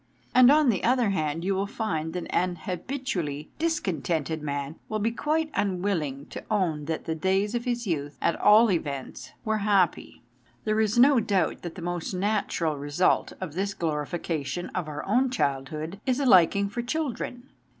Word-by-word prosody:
And 255 0 +8
on 295 -1 +5
the 200 -6 0
other 245 -3 +3
hand 160 -1 -1
you 195 - +1
will 195 +1 -1
find 160 -8 -3
that 180 - -3
an 180 0 +1
habitually 180 - -3
discontented 170 - -1
man 145 +1 -4
will 215 - -1
be 215 +2 0
quite 310 +6 -1
unwilling 175 -8 -1
to - - -7
own 175 -9 0
that 160 +1 -3
the 160 - -1
days 190 +6 0
of 240 0 -2
his 240 -1 -1
youth, 145 -6 -3
at 170 - +1
all 215 +1 +6
events, 140 -6 -4
were 220 -1 +1
happy. 200 - +1 0.4
There 215 0 +1
is 215 +1 +1
no 265 +1 +6
doubt 195 -6 0
that 170 -2 -7
the 180 - -8
most 175 +1 -3
natural 185 -5 0
result 145 +5 +1
of 185 -6 -5
this 195 +3 -2
glorification 160 +1 -3
of 180 -4 -3
our 150 -1 -5
own 250 +6 +2
child 135 - -1
hood 160 +6 -6
is 255 +1 +2
a 280 - 0
liking 200 -2 +5
for 205 +4 -3
children. 250 -2 -4
185 Hz, 175 wpm, -27 LUFS, 160-225 Hz, 0.4 s, And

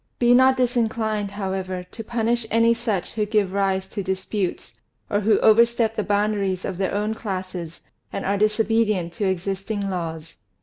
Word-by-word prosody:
Be 240 0 +4
not 260 +1 +5
disinclined, 225 -4 0
however, 190 -2 -4
to 225 - -7
punish 235 0 -1
any 230 +1 +4
such 230 -6 -2
who 215 - -1
give 205 -3 +1
rise 195 -1 +1
to 205 - -4
disputes, 190 0 -3 0.4
or 205 - +2
who 210 +1 +3
overstep 230 0 +4
the 215 - 0
boundaries 205 -2 0
of 180 - -4
their 195 0 0
own 210 +2 0
classes 185 -6 -5 0.3
and - - -4
are 200 - +1
disobedient 215 -4 +1
to 195 +1 0
existing 195 +2 -2
laws." 165 -3 -5
205 Hz, 160 wpm, -23 LUFS, 190-225 Hz, 0.4 s, not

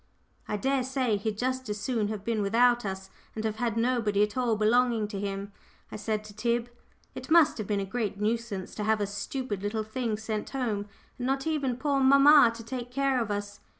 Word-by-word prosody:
"I 210 - -2
dare 270 +5 +1
say 260 -4 0
he'd 210 +1 -3
just 255 0 -2
as 210 0 -3
soon 220 -1 -1
have 210 -2 -5
been 225 -1 -1
without 240 +3 +3
us, 190 0 -5 0.2
and 220 0 -3
have 215 -1 -2
had 230 -1 -1
nobody 230 -4 +2
at 210 0 -2
all 245 -3 +1
belonging 225 +1 +2
to 200 -2 -5
him," 200 0 -4 0.4
I - - -6
said 215 0 -2
to 210 -1 -12
Tib. 235 +2 -1 0.4
"It - - -8
must 315 -5 +5
have 210 - -4
been 205 -2 0
a 195 - -2
great 210 -1 -3
nuisance 215 -3 -2
to 210 - -4
have 220 0 +2
us 205 0 -3
stupid 205 -1 -4
little 215 +2 -2
things 220 -1 -3
sent 215 -1 -3
home, 220 -7 -2 0.3
and 245 - -2
not 270 +1 0
even 280 -6 -1
poor 280 0 0
mamma 275 -1 +7
to 230 - -8
take 245 +1 -5
care 270 0 +1
of 225 - -3
us. 205 0 -4
225 Hz, 215 wpm, -28 LUFS, 210-250 Hz, 0.4 s, mamma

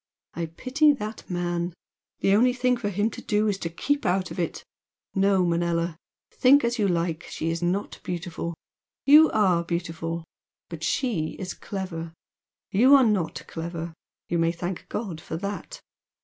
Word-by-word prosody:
I 170 -1 -3
pity 265 - +3
that 215 -4 -6
man! 175 -1 -2 0.5
The 195 - +4
only 245 +4 +5
thing 250 0 +2
for 235 -4 -2
him 205 +3 0
to - - -8
do 210 0 +1
is 200 -2 0
to 170 - -3
keep 285 - -1
out 185 -1 0
of - - -6
it! 170 - -2 0.5
No, 195 -2 +3
Manella! 170 -1 0 0.4
think 275 +2 +5
as 235 0 0
you 205 - +3
like, 170 -1 -1
she 165 - -2
is 165 +1 -3
not 180 +4 -1
beautiful. 170 -1 -4 0.5
You 305 +3 +8
ARE 185 -6 +3
beautiful. 165 -1 -3 0.5
But 165 -2 -7
SHE 175 - 0
is 185 -2 -4
clever, 170 -5 -5 0.6
You 255 +8 +7
are 270 - +7
NOT 170 -8 0
clever. 170 0 -5 0.3
You 170 - 0
may 165 0 +3
thank 175 +1 -5
God 185 -8 -4
for 160 - -5
that! 200 +3 -5
180 Hz, 165 wpm, -26 LUFS, 170-215 Hz, 0.6 s, You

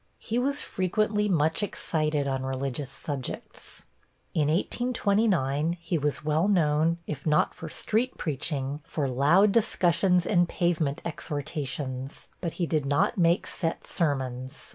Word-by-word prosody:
He 230 +2 -2
was 280 +3 0
frequently 210 +3 0
much 160 0 +2
excited 155 -7 -1
on 135 -1 -1
religious 135 +1 -3
subjects. 135 -1 -6 0.5
In 150 -2 +2
1829, 180 - +1
he 170 0 -1
was 150 +1 -2
well 155 +4 +2
known, 165 -3 +3
if 150 0 -5
not 150 0 +3
for 160 - -8
street 230 +10 -1
preaching, 145 -1 -2
for 150 -3 -2
loud 150 +11 +4
discussions 180 -5 +3
and 175 -1 +3
pavement 165 -5 0
exhortations, 145 -4 -4
but 170 -3 -3
he 175 - -1
did 155 -4 0
not 145 +9 +2
make 170 0 +3
set 165 -3 -3
sermons. 130 -5 -2
155 Hz, 130 wpm, -27 LUFS, 140-180 Hz, 0.5 s, loud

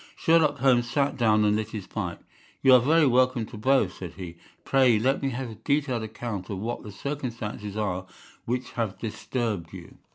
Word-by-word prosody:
Sherlock 160 -3 +3
Holmes 125 -2 +3
sat 140 +2 +1
down 110 -4 +3
and 105 0 +3
lit 110 0 -2
his 105 -4 -6
pipe. 90 -4 -5 0.4
"You 130 - +7
are 125 - +9
very 155 +5 +4
welcome 130 -2 +3
to 115 - -11
both," 110 -3 +2
said 90 -3 -8
he. 90 -3 -8 0.3
"Pray 130 -4 +4
let 130 +5 +1
me 135 - 0
have 125 -1 -4
a - - -9
detailed 140 -5 0
account 110 -3 -5
of 100 - -3
what 115 +5 -4
the 105 - -9
circumstances 110 -4 -5
are 95 -3 -2 0.4
which 125 +2 -3
have 110 -6 -3
disturbed 105 -4 -3
you." 90 -3 -11
115 Hz, 190 wpm, -26 LUFS, 105-130 Hz, 0.4 s, are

